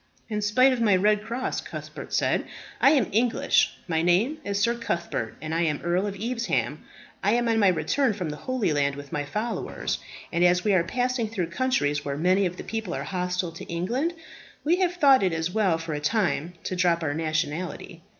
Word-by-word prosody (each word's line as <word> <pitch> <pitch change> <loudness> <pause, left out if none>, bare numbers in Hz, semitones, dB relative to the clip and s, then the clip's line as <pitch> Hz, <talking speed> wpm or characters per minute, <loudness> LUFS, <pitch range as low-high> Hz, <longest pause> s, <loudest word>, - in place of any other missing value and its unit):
"In 210 -1 -2
spite 255 +6 +4
of 245 - -2
my 210 -4 +4
red 210 +2 +3
cross," 235 +4 -3
Cuthbert - - -8
said, - - +1 0.3
"I - - +6
am 275 -8 +3
English. 230 +3 +2
My 160 -2 +1
name 195 - +2
is 200 0 -1
Sir 235 +3 +3
Cuthbert, 170 - -3
and 155 0 -3
I 165 - +1
am 150 -3 0
Earl 175 +4 +1
of 200 - -4
Evesham. 235 +2 -1 0.4
I 205 - +3
am 240 0 +2
on 225 -1 +2
my 205 - +5
return 185 - +2
from 180 -6 -4
the 150 - -6
Holy 250 -8 -1
Land 140 -1 +1
with 145 0 -10
my 145 -1 -2
followers; 215 +11 -3 0.3
and 170 +1 +2
as 180 0 +4
we 210 - +2
are 180 -3 +4
passing 245 +4 -1
through 185 -7 -3
countries 195 - 0
where 140 -1 -3
many 185 +4 +3
of 180 +1 -7
the - - -6
people 220 -5 -4
are - - -3
hostile 180 -1 -2
to 165 - -9
England, 240 - -1 0.5
we 335 +4 +3
have 360 -2 +1
thought 275 -6 +6
it 185 -3 +1
as 165 +2 -1
well 195 -5 +2
for 165 -1 -5
a 150 - -2
time 175 -1 0
to 185 - -3
drop 175 -2 +2
our 145 -2 0
nationality. 160 +2 -3
185 Hz, 210 wpm, -26 LUFS, 165-230 Hz, 0.5 s, I